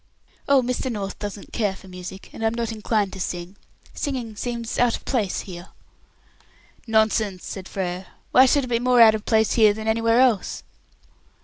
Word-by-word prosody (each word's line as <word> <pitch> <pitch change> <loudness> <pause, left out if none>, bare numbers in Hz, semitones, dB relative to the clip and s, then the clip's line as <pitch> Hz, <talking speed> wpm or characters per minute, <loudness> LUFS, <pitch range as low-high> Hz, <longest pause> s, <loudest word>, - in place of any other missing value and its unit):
"Oh, 275 -2 +5
Mr. 250 +1 -2
North 200 -3 -5
doesn't 205 -1 -7
care 205 -4 0
for 190 - -15
music, 185 +1 -9
and 225 - -7
I'm 225 +1 +1
not 235 -1 -2
inclined 215 -2 -1
to 190 - -7
sing. 175 +1 -5 0.4
Singing 250 -7 -4
seems 235 +1 -4
out 245 -1 +3
of - - -10
place 220 -8 -1
here." 175 -1 -9 1.2
"Nonsense," 220 -3 +1
said 190 -2 -7
Frere. 185 -1 -4 0.2
"Why 260 +1 +7
should 285 +2 +3
it - - -4
be 235 -1 +1
more 250 0 +3
out 220 -1 +8
of 220 -1 -4
place 220 -2 +2
here 215 -3 +5
than 220 0 -6
anywhere 230 +1 +3
else?" 245 -7 +2
220 Hz, 180 wpm, -23 LUFS, 195-235 Hz, 1.2 s, out